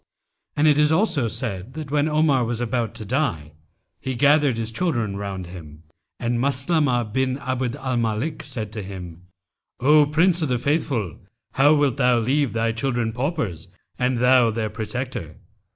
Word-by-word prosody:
'[FN#289] - - -56
And 150 +1 +4
it 150 -1 +5
is 150 0 +4
also 160 - +2
said 110 -1 -4
that 155 -3 -6
when 150 +1 +2
Omar 150 -4 +3
was 120 0 -2
about 120 -1 -2
to 110 - -6
die, 105 - -1 0.5
he 130 -1 -4
gathered 145 -1 +3
his 115 0 -2
children 115 - -1
round 100 -2 -5
him, 80 -3 -11 0.4
and 120 0 -1
Maslamah[FN#290] 130 -3 +1
bin 130 0 0
Abd 130 -2 -2
al 130 -3 -2
Malik 115 +7 -1
said 115 -7 -6
to 110 -1 -5
him, 90 -3 -9 0.5
'O 150 +3 +5
Prince 165 +4 +3
of 155 - 0
the 125 - +1
Faithful, 130 - -1 0.3
how 145 +3 +4
wilt 145 -3 +1
thou 125 -2 +3
leave 130 +4 +1
thy 115 0 +1
children 120 -1 -1
paupers 125 - -3 0.3
and 125 0 +1
thou 125 -1 +5
their 110 -1 -2
protector? 110 - -5
125 Hz, 170 wpm, -23 LUFS, 110-145 Hz, 0.5 s, it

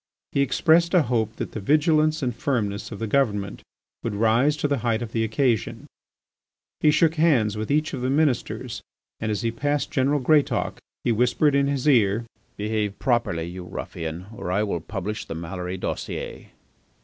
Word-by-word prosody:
He 140 - +1
expressed 165 +6 +3
a 175 - +6
hope 115 -3 -1
that - - -5
the - - -5
vigilance 155 - +2
and 125 -3 -1
firmness 110 -6 -2
of 105 - -6
the 115 - -3
Government 105 -5 0 0.4
would 110 -3 -3
rise 115 +8 +3
to 145 - 0
the 140 -2 0
height 115 0 0
of 115 - -7
the 115 -1 0
occasion. 115 +2 0 0.9
He 155 - +4
shook 155 +1 +4
hands 140 -10 +3
with 110 0 -4
each 155 +2 +1
of 130 - -4
the 130 - 0
ministers 140 -3 0 0.4
and 110 - -2
as 105 +2 -2
he 115 - +1
passed 145 +5 -1
General 140 +2 +2
Greatauk 145 +2 +2 0.2
he - - +2
whispered 125 +6 +2
in 140 0 +3
his 140 0 -1
ear: 115 -4 +3 0.3
"Behave 105 -1 -2
properly, 120 - 0
you 90 +2 -6
ruffian, 85 0 -6
or 90 -6 -4
I 100 +3 +2
will 100 -6 -2
publish 105 +3 -4
the 80 - -6
Maloury 90 +2 -5
_dossier! - - -5
115 Hz, 175 wpm, -24 LUFS, 105-145 Hz, 0.9 s, a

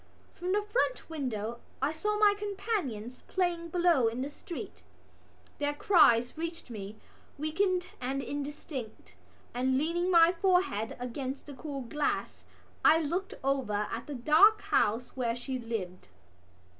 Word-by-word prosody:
From 360 +1 -3
the 415 +2 +2
front 475 -2 -1
window 235 -6 -3 0.2
I 275 +3 +1
saw 420 +7 -1
my 420 -1 +6
companions 390 - -3
playing 345 -2 -1
below 340 -8 +3
in 235 +3 -2
the 285 - -5
street. 340 +3 -8 0.8
Their 290 0 0
cries 270 - +5
reached 330 -4 -5
me 205 -1 -7 0.4
weakened 360 +4 0
and 265 +2 -1
indistinct 280 -4 -6 0.4
and, 260 +1 +1
leaning 340 +5 0
my 335 -1 +7
forehead 360 - +1
against 260 +2 -4
the 290 - -9
cool 275 +1 -6
glass, 290 +5 -2 0.4
I 320 - +7
looked 340 +5 -2
over 255 -7 0
at 230 +1 -5
the 290 - -5
dark 320 - +5
house 225 +4 +1
where 240 -3 0
she 255 +1 -4
lived. 210 -6 -5
290 Hz, 135 wpm, -30 LUFS, 245-355 Hz, 0.8 s, my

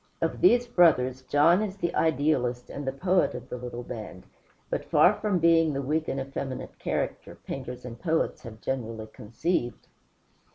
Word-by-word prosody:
Of - - -2
these 245 -9 +5
brothers, 130 - +3
John 150 +8 +4
is 200 -2 -3
the 170 -3 -2
idealist 135 -5 +1
and 140 -1 -6
the - - +1
poet 180 +7 +1
of - - -8
the - - -4
little 120 0 -6
band, 110 -6 -8 0.4
but - - -2
far - - +6
from 205 -3 0
being 165 -2 +4
the 140 - -2
weak 155 +4 -1
and 135 - -2
effeminate 135 -1 -5
character - - -3
painters 125 -2 -7
and 120 -1 -8
poets 160 -2 0
have 110 -2 -11
generally 115 -4 -3
conceived. 120 +5 -3
135 Hz, 165 wpm, -27 LUFS, 125-165 Hz, 0.4 s, far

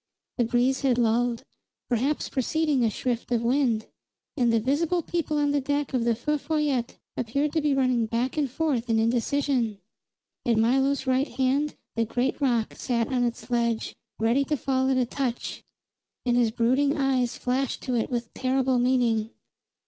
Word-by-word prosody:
The 240 - +4
breeze 250 +3 +1
had 260 -4 +2
lulled, 235 0 +1 0.4
perhaps 260 +5 0
preceding 290 0 0
a 225 - +3
shift 240 +3 -3
of 235 -1 +1
wind; 240 -3 +1 0.5
and 245 -5 +2
the 230 - +3
visible 310 +8 0
people 315 -3 -2
on 290 -1 +2
the 285 0 +1
deck 285 +1 -1
of 245 -3 +1
the 235 -1 +2
Feu 300 +6 -1
Follette 285 -5 -1 0.2
appeared 280 +5 -1
to 320 - +1
be 290 -2 +2
running 255 -4 +2
back 235 +3 -1
and 295 -3 0
forth 260 -4 -1
in 225 - +3
indecision. 235 0 +1 0.7
At 235 -2 +2
Milo's 265 +4 +2
right 260 +2 +2
hand 270 +4 0 0.2
the 230 0 +1
great 250 +6 -1
rock 240 -5 +1
sat 235 -2 -1
on 250 -1 +2
its 240 +1 -3
ledge, 235 -2 0 0.2
ready 230 +5 +2
to 300 0 -1
fall 260 0 0
at 265 - +2
a 255 - +2
touch, 245 -1 -3 0.6
and 240 -1 +2
his 240 -2 +3
brooding 260 +6 +1
eyes 260 -3 +1
flashed 255 +1 -1
to 255 - -2
it 230 -2 0
with 235 -2 -3
terrible 260 -1 +1
meaning. 240 -3 +2
255 Hz, 170 wpm, -26 LUFS, 235-280 Hz, 0.7 s, The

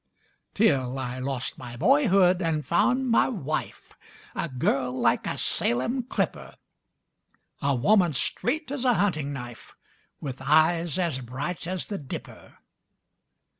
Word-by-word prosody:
Till 135 - +2
I 130 -1 -4
lost 130 -1 -4
my 120 -1 -8
boyhood 195 - +4
and 160 -3 -1
found 250 +7 +2
my 230 - +4
wife, 155 - -4 0.4
A 170 - -3
girl 130 0 -1
like - - +2
a - - -2
Salem 130 - +1
clipper! 245 - -3 1.1
A 140 -2 +1
woman 175 - +3
straight 310 - -1
as 280 -3 -3
a 250 -2 +3
hunting 170 -7 0
knife 120 -4 -9 0.4
With 135 -3 -6
eyes 165 +2 +3
as 170 -8 -1
bright 140 +9 -5
as 185 -1 -2
the 200 -2 -5
Dipper! 135 - -9
155 Hz, 130 wpm, -26 LUFS, 130-200 Hz, 1.1 s, boyhood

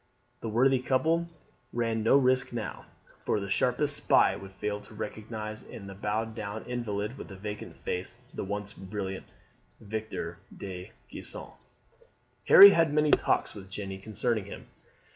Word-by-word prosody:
The 115 - -4
worthy 130 +4 +4
couple 160 +7 +1 0.4
ran 115 -1 0
no 115 +5 +5
risk 130 -2 +2
now, 115 -3 -5 0.4
for - - +1
the 100 -1 -5
sharpest 140 +7 +1
spy 145 - +4
would 95 0 -10
fail 105 +1 -3
to 105 - -14
recognize 110 0 -5
in 100 - -10
the 100 - -8
bowed 110 +3 -2
down 110 -1 -5
invalid 120 0 -3
with - - -8
vacant 105 +2 -7
face, 95 +6 -4 0.2
the - - -4
once 100 +1 -4
brilliant 95 0 -5 0.5
Victor 105 -6 -5 0.2
de 95 +1 -7 0.2
Gisons. - - -6 0.9
Harry 200 0 +12
had 165 -5 +3
many 150 0 +3
talks - - +2
with 95 -2 -10
Jeanne 95 -1 -6
concerning 110 +1 -1
him. 100 - -9
110 Hz, 145 wpm, -29 LUFS, 100-125 Hz, 0.9 s, Harry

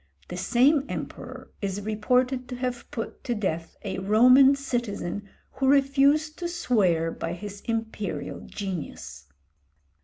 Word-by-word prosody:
The - - -5
same 255 - +3
emperor - - -7
is 200 0 -2
reported 250 +5 0
to 250 - -4
have 250 -1 -4
put 225 - -6
to 240 - -1
death 170 -6 -3
a 195 - -3
Roman 250 +7 +6
citizen 210 -7 -3 0.2
who 270 - -1
refused 280 +3 +3
to 350 - -2
swear 200 - +1
by 165 +1 -4
his 200 +2 -8
"imperial 220 - -3
genius." 140 - -6
225 Hz, 125 wpm, -26 LUFS, 195-265 Hz, 0.2 s, Roman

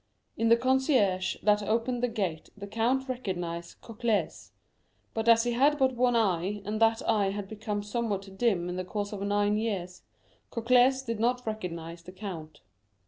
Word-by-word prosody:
In 225 0 +1
the 230 - +7
concierge 255 -7 +2
that 210 0 +4
opened 230 +4 0
the 245 - +2
gate 195 -9 -3
the 200 - -7
count 235 +6 0
recognized 175 -9 -4
Cocles; 225 -1 -2 0.6
but 225 +1 0
as 230 0 +6
he 240 - 0
had 280 +5 +3
but 265 -2 +2
one 245 0 +2
eye, 200 -2 0
and 215 +2 -3
that 225 0 +3
eye 200 -3 +2
had 200 0 -4
become 210 -1 -4
somewhat 205 -3 -3
dim 190 -6 +1
in 180 0 -4
the 185 - -2
course 205 +2 -4
of 200 - -5
nine 205 +1 +1
years, 185 -5 -3 0.5
Cocles 250 +2 +3
did 230 -3 -3
not 245 +2 +1
recognize 170 -6 -5
the 180 +2 -12
count. 170 -6 -8
215 Hz, 170 wpm, -29 LUFS, 195-235 Hz, 0.6 s, the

